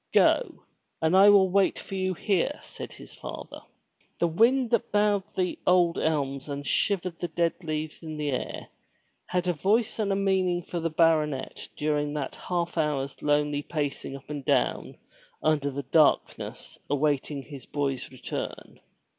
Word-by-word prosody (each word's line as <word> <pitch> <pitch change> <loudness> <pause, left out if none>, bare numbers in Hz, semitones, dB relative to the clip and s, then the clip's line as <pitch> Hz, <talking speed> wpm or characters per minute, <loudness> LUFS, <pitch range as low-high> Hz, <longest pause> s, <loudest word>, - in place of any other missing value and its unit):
"Go, - - +3 0.4
and 160 +3 +2
I 195 +2 +8
will 195 -2 +6
wait 195 0 +3
for - - -9
you 185 -1 -1
here," 200 - 0
said - - -8
his - - -13
father. - - -8 0.6
The - - +2
wind 230 +9 +3
that 235 - +1
bowed 205 -1 +3 0.2
the 180 -1 0
old 175 -2 +4
elms 140 -3 -1
and 145 0 -4
shivered 180 +2 0
the 175 - -2
dead 170 +2 -1
leaves 155 -1 -4
in 155 -2 -6
the 150 -1 -1
air, 130 - -4 0.6
had 180 0 -1
a 180 - +2
voice 215 +8 +1
and 205 -2 +1
a - - +2
meaning 190 -3 +1
for 175 - -4
the 165 0 -1
baronet 155 -4 +1
during 150 -1 0
that 145 -2 -3
half 175 -1 -2
hour's 140 -3 -1
lonely 145 0 +1
pacing 145 -3 -3
up 135 - -12
and 145 -2 -5
down - - 0 0.5
under 150 -2 +2
the 140 +1 -4
darkness 150 +3 +1
awaiting 145 0 0
his 140 -4 -11
boy's 135 -3 -2
return. 130 - -6
160 Hz, 160 wpm, -27 LUFS, 145-185 Hz, 0.6 s, I